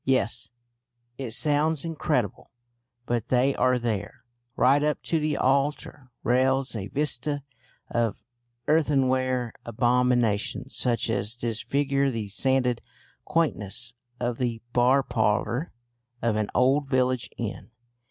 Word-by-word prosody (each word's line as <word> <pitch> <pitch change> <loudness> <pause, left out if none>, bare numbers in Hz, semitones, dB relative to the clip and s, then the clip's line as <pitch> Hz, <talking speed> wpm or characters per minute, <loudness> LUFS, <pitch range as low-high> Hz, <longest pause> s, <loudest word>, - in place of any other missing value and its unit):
Yes, 120 -3 +1 0.7
it 130 -3 -3
sounds 150 +5 +2
incredible, 150 - -1 0.6
but 120 -1 -1
they 130 +2 +3
are 130 0 +3
there 110 -3 -3 0.3
right 140 +3 +4
up 150 0 +1
to 165 - +1
the 150 -1 0
altar 140 0 0
rails 130 +2 +2
a 100 -3 -4
vista 145 +1 -1 0.4
of 115 -2 -1 0.4
earthenware 130 -5 +2
abominations 120 -2 +1
such 120 -2 +1
as 110 0 -1
disfigure 135 +4 0
the 110 -5 -4
sanded 125 +2 +1 0.4
quaintness 120 - -1 0.3
of 120 -1 -2
the 120 -3 -1
bar 130 +3 +4
parlour 120 - 0 0.5
of 115 -2 0
an 105 -1 -1
old 135 +3 +3
village 130 -2 +1
inn. 115 0 -5
125 Hz, 115 wpm, -26 LUFS, 115-140 Hz, 0.7 s, right